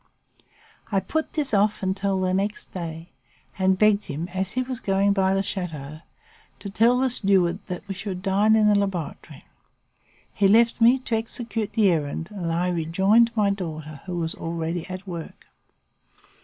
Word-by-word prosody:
I 195 - +3
put 315 - -3
this 295 -6 -1
off 205 0 +2
until 195 0 0
the 185 0 0
next 200 +2 -2
day, 165 -1 -6 0.5
and 190 0 +3
begged 210 0 +3
him, 165 +5 -5
as 185 +1 -3
he 255 - 0
was 255 -1 -5
going 200 -2 +2
by 190 -1 +2
the 195 - +1
chateau, 155 -7 -5 0.6
to 200 - -7
tell 235 +5 +4
the 260 0 +1
steward 190 -6 +2
that 180 +1 -6
we 195 - -3
should 185 -1 -6
dine 205 +3 +3
in 215 -1 +4
the 210 - +5
laboratory. 195 -6 -3 0.9
He 200 - +3
left 230 +3 +4
me, 240 +3 +6
to 255 -3 -2
execute 225 -1 -3
the 210 -4 +4
errand 160 +1 -2
and 180 -5 -3
I 175 +2 0
rejoined 190 +7 +3
my 205 -2 +3
daughter, 155 -6 -6
who 180 -1 -3
was 165 -1 -2
already 165 +1 -4
at 185 +1 -7
work. 170 -4 -8
195 Hz, 170 wpm, -24 LUFS, 175-210 Hz, 0.9 s, me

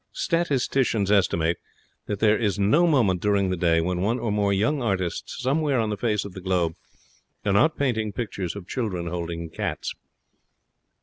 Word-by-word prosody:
Statisticians 135 - +1
estimate 85 -5 +2 0.5
that 100 -2 -3
there 110 -1 +5
is 105 -3 0
no 145 - +4
moment 110 - +2
during 100 -2 +2
the - - +1
day 85 -1 +2
when 90 +1 -1
one 110 +5 +1
or 115 -4 -2
more 100 -1 +1
young 110 +9 +1
artists 95 -6 -2
somewhere 140 +1 +1
on 110 -2 0
the - - 0
face 105 0 -1
of 100 - -8
the 95 - -8
globe 90 -3 0 0.7
are 100 - +2
not 135 +11 +3
painting 110 -6 0
pictures 100 -5 -4
of 100 -3 -8
children 100 -9 -3
holding 85 -1 -4
cats. - - -3
100 Hz, 170 wpm, -25 LUFS, 90-120 Hz, 0.7 s, there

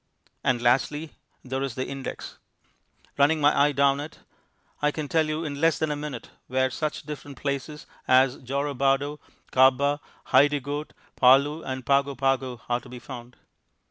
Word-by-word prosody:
And 120 -2 +1
lastly 145 +5 +1 0.3
there 130 +1 -3
is 135 -4 -3
the 130 - -2
index. 135 -1 -7 0.8
Running 150 +3 +4
my 145 0 +4
eye 145 +1 +4
down 140 0 +3
it, 150 +3 -7 0.6
I 150 - +3
can 150 0 -4
tell 160 +1 +2
you 155 +2 -2
in 145 -1 -5
less 165 -1 +3
than 155 -1 -1
a - - -1
minute 145 -5 -7 0.2
where 130 +1 +1
such 155 +3 -3
different 145 -2 -8
places 140 +2 -4 0.2
as 130 +1 +4
Jorobado, 140 +2 0 0.3
Kabba, 135 +3 +4 0.3
Hidegkut, 145 +1 +2 0.2
Paloo, 140 +5 +5
and 130 -1 -5
Pago 140 0 +2
Pago 130 -2 -1
are 120 0 +1
to - - -15
be 125 - -8
found. 120 -1 -10
140 Hz, 155 wpm, -26 LUFS, 130-145 Hz, 0.8 s, Paloo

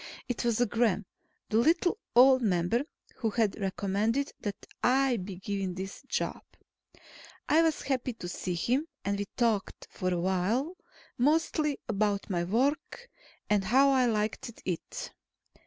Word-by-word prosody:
It 245 -3 -2
was 235 -2 +1
Gremm, 225 -3 +1 0.4
the 215 - +2
little 335 - +3 0.2
old 260 +1 +7
member, 195 +2 +1 0.4
who 230 -4 0
had 215 -2 0
recommended 205 +7 0
that 205 -2 -5 0.2
I 260 0 +3
be 190 -1 -6
given 190 -1 -3
this 190 +1 -6
job. - - -2 1.1
I 320 - +5
was 325 -2 +1
happy 255 -2 -1
to 200 -6 -7
see 180 0 -3
him, 255 - 0 0.2
and 200 0 0
we 205 - -1
talked 225 -5 0
for 185 0 -2
a 175 - 0
while, 195 - 0 0.4
mostly 300 +1 +2
about 205 -1 0
my 175 -2 0
work, 280 - -1 0.4
and 205 -2 +2
how 270 +7 +5
I 260 -2 +4
liked 220 +1 -2
it. 180 -3 -4
225 Hz, 140 wpm, -29 LUFS, 195-265 Hz, 1.1 s, old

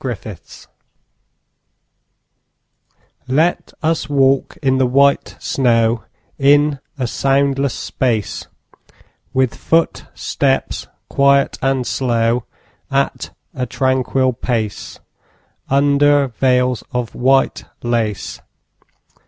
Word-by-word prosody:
VELVET 110 -6 -5
SHOES - - -15 2.6
Let 155 +7 +1
us 160 -1 0
walk 135 -1 +2
in 130 -1 +2
the 130 - +3
white 140 +2 +2
snow 115 -3 +1 0.3
In 145 +1 +4 0.2
a 130 - -1
soundless 135 +1 +1
space; 115 -6 -2 0.8
With 130 -2 +1
footsteps 165 0 -1 0.2
quiet 140 0 +2
and 135 -2 0
slow, 120 -2 0 0.4
At - - -1 0.2
a 125 -1 -3
tranquil 130 0 +1
pace, 115 -3 -3 0.7
Under 145 0 +3
veils 125 0 +1
of 125 -2 -3
white 135 +2 +2 0.2
lace. 115 -4 -2
130 Hz, 85 wpm, -18 LUFS, 120-140 Hz, 2.6 s, In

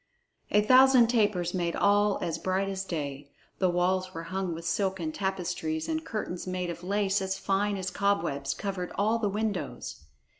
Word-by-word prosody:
A 210 0 +4
thousand 255 0 +6
tapers 205 -7 +1
made 170 -2 -1
all 205 0 +3
as 165 -2 -2
bright 190 +2 0
as 195 0 -3
day; 145 -5 -4 0.3
the 185 - +3
walls 185 +1 0
were 165 - -4
hung 185 0 -3
with 165 +1 -8
silken 180 -2 -1
tapestries, 170 -4 -2
and 320 0 -2
curtains 185 - -4
made 180 -1 -2
of 170 +1 -9
lace 200 +1 +1
as 190 0 -2
fine 200 +1 0
as 190 0 -3
cobwebs 165 -9 0
covered 195 -3 -4
all 220 +3 +2
the 210 -3 0
windows. 215 +1 -3
190 Hz, 165 wpm, -28 LUFS, 175-205 Hz, 0.3 s, thousand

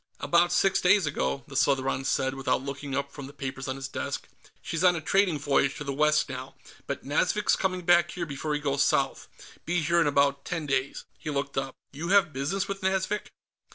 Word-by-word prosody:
"About 170 0 +3
six 195 -1 +3
days 190 0 +4
ago," 140 -2 -1
the 140 - -10
Southron 135 -1 +1
said, 130 -1 +1
without 135 -1 -1
looking 140 0 -5
up 140 0 -2
from 140 -2 -8
the 140 - -12
papers 135 -1 -5
on 130 - -2
his 135 -1 -5
desk. - - -4 0.3
"She's 165 +1 -3
on 180 -1 +6
a - - -2
trading 180 +1 +2
voyage 140 -1 +1
to - - -6
the 140 -1 -3
west 150 +2 +3
now, 130 0 -7 0.3
but - - -4
Nazvik's - - +2
coming 185 -1 -1
back 175 -1 +4
here 175 -1 -4
before 150 0 -3
he - - -1
goes 140 -2 +1
south. - - 0 0.4
Be 175 0 0
here 170 +2 +3
in 155 - +3
about 140 -1 +2
ten 165 -3 -3
days." 135 -1 -1 0.2
He 155 - -6
looked 140 -1 -2
up. 135 -1 -2 0.2
"You 155 +4 -5
have 190 -4 +4
business 165 +10 -1
with 195 0 -5
Nazvik?" 190 +2 -1
145 Hz, 210 wpm, -27 LUFS, 135-175 Hz, 0.4 s, on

